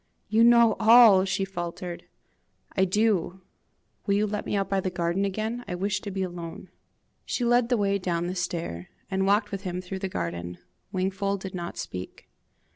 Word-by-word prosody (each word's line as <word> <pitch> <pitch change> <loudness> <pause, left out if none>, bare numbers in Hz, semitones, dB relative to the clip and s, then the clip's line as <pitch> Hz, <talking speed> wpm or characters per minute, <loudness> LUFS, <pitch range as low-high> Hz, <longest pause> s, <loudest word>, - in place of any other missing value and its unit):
"You 220 +2 +4
know 235 -2 +6
all!" 220 -4 +7
she 195 0 -1
faltered. 175 -1 -6 0.7
"I 190 - +3
do. 190 -2 +1 0.7
Will 200 - +3
you 210 +1 +2
let 210 0 -4
me - - -1
out 195 -1 0
by 195 - 0
the 190 - -1
garden 175 +2 -1
again? 220 +5 -3
I 180 - -3
wish 195 +2 -1
to 205 - -6
be 190 -1 -2
alone." 175 -2 -7 0.5
She 245 - -2
led 240 0 +3
the 245 - +2
way 200 -1 +1
down 175 -2 -1
the 180 - -2
stair, 165 - -4 0.2
and 190 0 +1
walked 205 +1 +2
with 195 -1 -4
him 180 -1 -4
through 185 +1 -6
the 190 0 -3
garden. 85 - -4 0.3
Wingfold 195 +1 -1
did 190 -1 -6
not 175 -1 -5
speak. 90 0 -7
190 Hz, 185 wpm, -26 LUFS, 175-205 Hz, 0.7 s, all